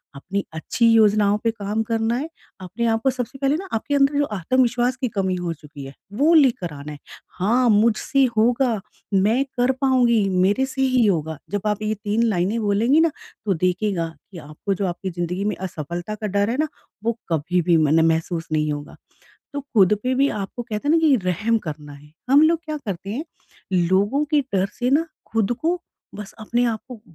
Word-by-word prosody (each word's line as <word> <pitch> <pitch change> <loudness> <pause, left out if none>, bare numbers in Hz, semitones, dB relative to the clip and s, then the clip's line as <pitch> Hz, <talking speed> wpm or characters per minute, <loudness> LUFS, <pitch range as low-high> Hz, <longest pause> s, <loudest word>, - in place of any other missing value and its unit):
अपनी 195 +8 -3
अच्छी 230 +9 0
योजनाओं 210 -2 +4
पे 230 - +2
काम 215 0 -2
करना 225 +1 0
है 300 +5 -4 0.3
अपने 185 +6 -3
आप 225 0 +1
को 265 - +4
सबसे 255 +1 -4
पहले 275 +1 +2
ना 380 +4 -5
आपके 285 +6 -1
अंदर 280 +1 +3
जो 290 - +3
आत्मविश्वास 245 +5 +1
की 255 - +1
कमी 190 -1 +1
हो 175 -2 -3
चुकी 145 -3 -11
है 135 - -9 0.2
वो 310 +6 +4
लेकर 240 - +3
आना 145 +1 -8
है। 145 - -9 0.4
हाँ, 235 +6 +3
मुझसे 230 +5 +3
होगा, 235 -1 +2 0.3
मैं 215 +7 +3
कर 245 +2 +3
पाऊँगी, 240 -6 +3
मेरे 190 +7 +2
से 265 0 -4
ही 255 -3 +3
होगा। 160 -6 0
जब 205 -1 -1
आप 210 0 -1
ये 215 0 0
3 210 +2 -1
लाइनें 205 +1 +1
बोलेंगी 220 +9 +3
ना 325 -1 +3 0.3
तो 195 - +2
देखिएगा 180 0 0 0.2
कि 180 - -10
आपको 155 +6 -4
जो 195 +1 -2
आपकी 180 +2 -4
ज़िंदगी 175 +2 -3
में 210 - 0
असफ़लता 175 +2 -5
का 215 0 -4
डर 200 +2 +1
है 245 - -1
ना 310 - +2 0.4
वो 230 0 -1
कभी 170 +3 +1
भी 170 - +6
म 155 -2 +3
न 160 +2 +4
महसूस 165 +1 -1
नहीं 150 -1 +1
होगा 145 0 -6 0.6
तो 285 - -3
ख़ुद 210 -8 +3
पे 255 +1 0
भी 275 +2 +3
आपको 210 +4 -5
कहते 225 +3 -4
हैं - - +4
ना 330 - +5
कि 310 -4 +5
रहम 205 +6 +1
करना 150 -4 -8
है। 145 +1 -15 0.2
हम 285 +2 +7
लोग 325 +1 +4
क्या 310 -1 -4
करते 195 -1 -5
हैं 275 +9 -3 0.5
लोगों 195 - +2
के 300 - +5
डर 195 -8 -1
से 245 0 0
ना 290 +4 +4 0.3
ख़ुद 225 0 +1
को 345 +2 0 0.3
बस 210 -1 -8
अपने 240 +3 0
आप 225 -2 -1
को 245 -4 -9
215 Hz, 205 wpm, -22 LUFS, 180-250 Hz, 0.6 s, हम